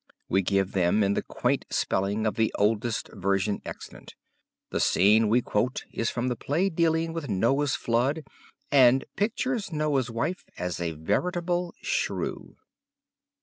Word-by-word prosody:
We 95 - +3
give 95 0 +1
them 95 +3 +2
in 100 0 +2
the - - 0
quaint - - -1
spelling 100 +3 0
of 110 - +1
the 110 -1 +1
oldest 110 +2 0
version 100 0 0
extant. - - -10 0.6
The - - -1
scene 105 +3 +4
we 120 +3 +3
quote 120 +5 -1
is 115 - 0
from 120 +1 -2
the 125 - 0
play 165 +11 0
dealing 165 0 +1
with 160 -5 -5
Noah's 130 +8 +1
flood 130 +7 0 0.5
and 130 -2 +5
pictures 225 0 -1
Noah's 150 -5 0
wife 140 +11 -2
as 90 -1 -3
a 85 -2 -2
veritable 175 - -1
shrew. - - -2
120 Hz, 145 wpm, -27 LUFS, 100-160 Hz, 0.6 s, and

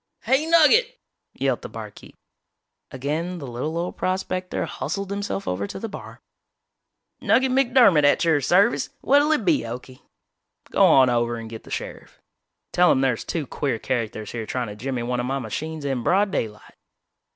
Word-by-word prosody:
"Hey, 270 +4 +2
Nugget!" 390 +10 +4 0.4
yelled - - -1
the - - -8
barkeep. - - -10 0.7
Again 155 +7 -3
the 150 - -7
little 130 +6 -4
old 175 +1 -3
prospector 185 0 -2
hustled 200 -1 -4
himself 200 0 -3
over 95 +2 -2
to - - -7
the 225 - -4
bar. 205 - -10 1.0
"Nugget 260 0 +3
McDermott 245 - +4
at 145 +3 +3
your 160 -3 +3
service! 195 - +3
What'll 285 +3 +4
it 295 -9 +1
be, 170 -4 +3
Okie?" 125 +2 -8 0.7
"Go - - +3
on 130 -2 +6
over 120 0 0
and 115 -1 -7
get 110 - -9
the - - -13
sheriff. - - -7 0.5
Tell 180 0 +4
him 130 - +2
there's 130 -4 0
two 160 -4 -3
queer 130 -1 -2
characters 110 -4 -3
here 115 -2 -5
trying 125 -3 -3
to 105 - -8
jimmy 125 +2 -3
one 125 +1 -2
of 120 - -2
my 135 +1 -1
machines 150 +6 -5
in 135 -3 -1
broad 195 - +2
daylight." 105 - -4
150 Hz, 170 wpm, -23 LUFS, 120-200 Hz, 1.0 s, on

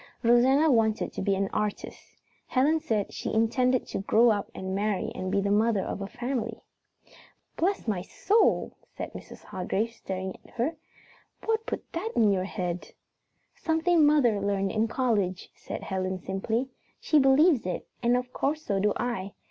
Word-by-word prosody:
Rosanna 260 +6 +5
wanted 220 -3 +1
to - - -4
be 195 0 +1
an 195 0 0
artist. 210 -1 -4 0.3
Helen 290 +5 +2
said 215 -8 -1
she - - -4
intended 250 +3 +2
to - - -3
grow 225 +4 +4
up 205 -2 -1
and 190 0 -4
marry 205 0 -1
and 185 0 -4
be 200 0 +2
the 200 0 0
mother 215 -1 +2
of - - -4
a 195 - -3
family. 240 -1 -4 0.9
"Bless 375 -4 0
my 200 -5 0
soul!" 415 - +1 0.2
said - - -5
Mrs. - - -11
Hargrave, 195 +5 -2
staring 190 -4 -5
at - - -20
her. 260 +8 0 0.7
"What 445 +1 0
put - - -4
that 425 +8 -3
in 215 -3 +4
your 185 -1 0
head?" 180 -3 -4 0.6
"Something 325 0 +2
mother 270 -9 +4
learned 195 -1 0
in 220 +1 +1
college," 215 -7 -1
said - - -7
Helen 185 0 -2
simply. 220 +7 -2 0.3
"She 310 - +3
believes 270 - +4
it, 180 - -3 0.2
and 240 0 +3
of 250 0 -5
course 305 +3 -1
so 200 -1 0
do 210 +1 +2
I. 200 -5 -3
225 Hz, 165 wpm, -27 LUFS, 195-265 Hz, 0.9 s, Rosanna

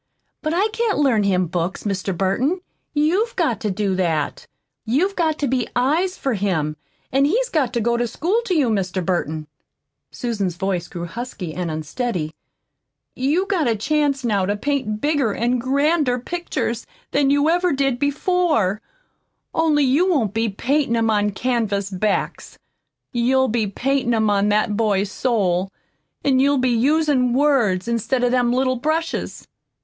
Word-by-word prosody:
But 310 +1 -1
I 395 +4 +3
can't 450 -1 0
learn 265 -7 +3
him 185 -2 +2
books, 175 +2 -3
Mr. 195 -2 -2
Burton. 255 - 0 0.3
You've 345 +10 +1
got 315 - 0
to 210 - -2
do 195 0 -1
that. 165 -5 -1 0.4
You've 335 - +1
got 320 -3 +1
to 285 - -1
be 250 -2 0
eyes 315 +10 +1
for 270 - -1
him, 180 -7 -1 0.4
an' 270 +2 +3
he's 475 +11 +1
got 285 - +1
to 240 - +1
go 235 +2 +1
to 240 0 0
school 350 - 0
to 370 - 0
you. 280 -7 +3
Mr. 185 -3 -1
Burton," 160 -4 -1 0.6
Susan's 205 -8 -3
voice 180 -1 -2
grew 175 -1 -6
husky 190 -4 -6
and 180 0 -3
unsteady, 155 - -3 0.8
"you've 300 +9 +1
got 350 -9 +1
a 230 - +2
chance 280 +2 0
now 205 -4 +1
to 205 - 0
paint 220 -4 -2
bigger 290 -8 +1
an' 240 +2 0
grander 280 +1 +1
pictures 250 -5 -3 0.3
than 280 0 +2
you 285 +1 +3
ever 350 +2 +2
did 270 -3 0
before, 285 - +1 0.7
only 310 -3 +3
you 290 +8 +3
won't 235 - +1
be 225 0 0
paintin' 255 +5 0
'em 225 -1 +2
on 210 -1 +2
canvas 205 -3 -1
backs. 195 +2 -2 0.5
You'll 260 +2 +2
be 220 -1 0
paintin' 245 +3 0
'em 220 -2 +2
on 205 0 +2
that 210 0 +1
boy's 205 -2 +1
soul, 195 -7 0 0.5
an' 265 -2 +3
you'll 280 +1 +3
be 255 -1 +2
usin' 265 0 +2
words 240 -10 +2
instead 235 +2 0
of 245 - +2
them 245 -1 +2
little 255 +1 +1
brushes." 315 +5 -2
245 Hz, 160 wpm, -21 LUFS, 205-290 Hz, 0.8 s, I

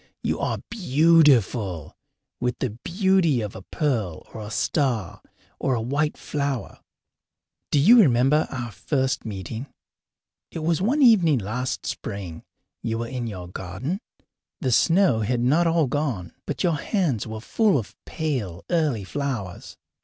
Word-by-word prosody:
You - - -1
are - - -1
beautiful, 135 - +3 0.4
with 125 0 -1
the 130 - -2
beauty 175 - +1
of 105 -2 -5
a 95 - -7
pearl 110 - -2
or 110 - -7
a 105 - -7
star 115 - -1 0.4
or 130 - +1
a - - -1
white 145 +6 -1
flower. 140 -4 -3 0.9
Do 145 - +3
you 225 - +7
remember 135 - +3
our 120 -3 -5
first 130 +1 -1
meeting? 110 +5 -5 0.8
It 160 - -6
was 170 +2 +1
one 270 +9 +2
evening 180 - +6
last 120 +5 -3
spring. 95 -6 -5 0.4
You 115 0 -2
were 115 0 -3
in 125 -2 -3
your 90 -5 -6
garden. 95 - -5 0.6
The 130 -7 -1
snow 170 - +4
had 120 +3 0
not 155 +8 +3
all 165 -1 +3
gone, 130 - -2
but 140 -2 -2
your 170 -4 +2
hands 155 - 0
were 110 0 -5
full 205 - +2
of 115 - -5
pale, 125 - -3
early 150 - +1
flowers. 120 -5 -4
130 Hz, 145 wpm, -24 LUFS, 110-160 Hz, 0.9 s, you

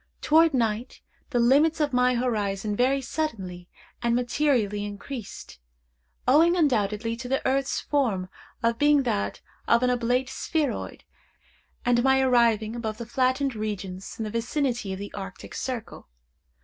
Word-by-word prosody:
Toward 320 +2 +4
night 230 0 -1 0.3
the 260 - -1
limits 285 +7 +4
of 295 -3 0
my 250 0 +3
horizon 210 -4 -1
very 265 +4 +2
suddenly 195 - -4 0.3
and 235 0 +1
materially 245 -5 +1
increased, 205 - -8 0.7
owing 325 +7 +5
undoubtedly 230 - +1
to 245 +2 -7
the 270 +1 +1
earth's 270 +1 0
form 225 -11 0 0.5
being 290 -1 +4
that 100 - -2 0.3
of 235 +1 +4
an 250 - +3
oblate 245 +1 +1
spheroid, 290 0 -2 0.8
and 240 -1 +3
my 265 0 +4
arriving 235 -4 +3
above 220 -2 -4
the 235 - -6
flattened 260 +3 +1
regions 200 -4 -5
in 225 - -3
the 215 - -4
vicinity 240 -2 -1
of 190 - -4
the 200 +1 -7
Arctic 195 -1 -8
circle. 245 - -5
240 Hz, 135 wpm, -26 LUFS, 210-270 Hz, 0.8 s, owing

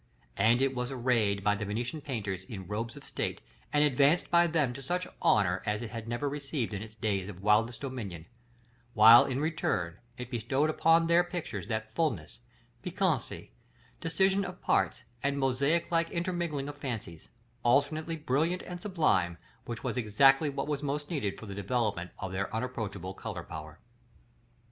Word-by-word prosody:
And 115 +5 +4
it 135 -1 +1
was 125 -1 -2
arrayed 115 -6 +1
by 105 - +4
the 105 0 -3
Venetian 120 +9 -3
painters 105 -9 -4
in 95 -4 -7
robes 110 +5 -4
of - - -11
state, - - -3 0.3
and 150 0 +4
advanced 145 +4 +3
by 170 0 +6
them 155 -6 +1
to 135 - -8
such 180 +6 -2
honor 95 -3 +3
as 105 +1 -1
it 110 - -6
had 115 -1 -6
never 120 +5 -2
received 140 -4 -3
in 100 - -3
its 110 0 -9
days 100 -3 -1
of 95 -1 -10
widest 115 +3 +3
dominion; 110 - -5 0.7
while, 115 +4 +9
in 130 -1 -1
return, 120 - -1 0.2
it 125 0 -7
bestowed 130 +6 +1
upon 165 +1 +4
their 170 +1 +5
pictures 170 - -5
that 110 -1 -3
fulness, 110 - -1 0.4
piquancy, - - -1 0.5
decision 190 +5 +2
of 180 -1 -6
parts, - - +1 0.2
and 140 0 0
mosaic 140 +6 +1
like 165 0 +2
intermingling 170 -5 -2
of 145 0 -8
fancies, 110 - -6 0.3
alternately 145 +6 +2
brilliant 160 +4 0
and 175 -1 -7
sublime, 125 - +1 0.3
which 115 -2 -6
were - - 0
exactly 135 +6 +4
what 140 0 -3
was 145 -2 -1
most 145 +1 -3
needed 130 - -2
for - - -9
the 100 - -7
developement 100 -3 -1
of 95 - -5
their 95 +1 -2
unapproachable 110 -6 -4
color 95 -4 -6
power. 80 -1 -9
125 Hz, 170 wpm, -30 LUFS, 105-150 Hz, 0.7 s, while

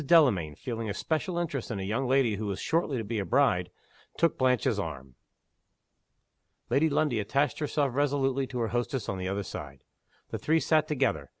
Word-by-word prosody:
Delamayn, 125 - +4
feeling 115 - -4
a 100 - -3
special 165 - -1
interest 150 -7 -2
in 110 - -3
a - - -3
young 115 +7 -1
lady 125 -5 +3
who 105 0 -3
was 100 -1 -3
shortly 160 -2 0
to 115 - -2
be 110 +1 -2
a 100 - -2
bride, 120 -10 +2 0.5
took 170 -2 +3
Blanche's 125 -3 +2
arm. 70 -8 -5 1.6
Lady 155 +3 +4
Lundie 145 -5 +1
attached 140 +6 0
herself 145 -2 0
resolutely 135 -1 +1
to 125 - -6
her 115 - 0
hostess 120 0 -2
on 95 - -3
the 95 - -3
other 100 +1 -2
side. 70 -7 -8 0.5
The - - -3
three 160 +1 +2
sat 155 -1 +2
together. 130 - 0
Mrs. - - -27
125 Hz, 190 wpm, -29 LUFS, 100-145 Hz, 1.6 s, Delamayn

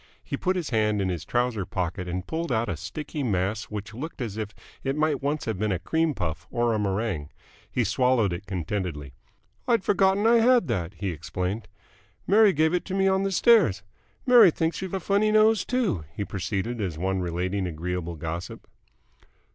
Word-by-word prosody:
He - - -4
put 185 0 0
his 170 -7 -3
hand 105 -2 +2
in 95 -1 0
his 90 -4 -4
trouser 120 -4 0
pocket 90 0 -3
and 90 +1 -3
pulled 160 - -3
out 115 -2 0
a 95 - -1
sticky 150 - -6
mass 105 -2 -1
which 105 +1 -7
looked 150 +9 -7
as 115 -6 -4
if 110 -2 -3 0.3
it 135 0 -1
might 150 -2 +1
once 145 +2 -1
have 110 -4 -3
been 105 0 0
a 95 - +1
cream 160 - 0
puff 80 -4 -4
or 120 -1 +1
a 110 - 0
meringue. 100 -6 -1 0.4
He 125 - 0
swallowed 115 -3 +2
it 95 +3 -7
contentedly. 90 -6 -4 0.5
"I'd 230 -5 +3
forgotten 195 +1 +3
I 235 +1 +6
had 240 +1 +4
that," 95 -4 -2
he 100 -2 -3
explained. 90 +7 -4 0.6
"Mary 210 +1 +6
gave 160 0 +2
it 180 - +1
to 190 - -4
me 195 0 +3
on 190 0 +3
the 195 0 0
stairs. 190 - +4 0.4
Mary 245 -6 +8
thinks 165 +2 -1
you've 190 0 -4
a - - -1
funny 205 +4 +2
nose, 215 -1 +4
too," 220 - -1
he 100 - -3
proceeded, 100 +6 -3
as 90 -6 -3
one 95 +3 -1
relating 90 +2 -2
agreeable 85 +1 -4
gossip. 80 +3 -6
110 Hz, 190 wpm, -26 LUFS, -, 0.6 s, Mary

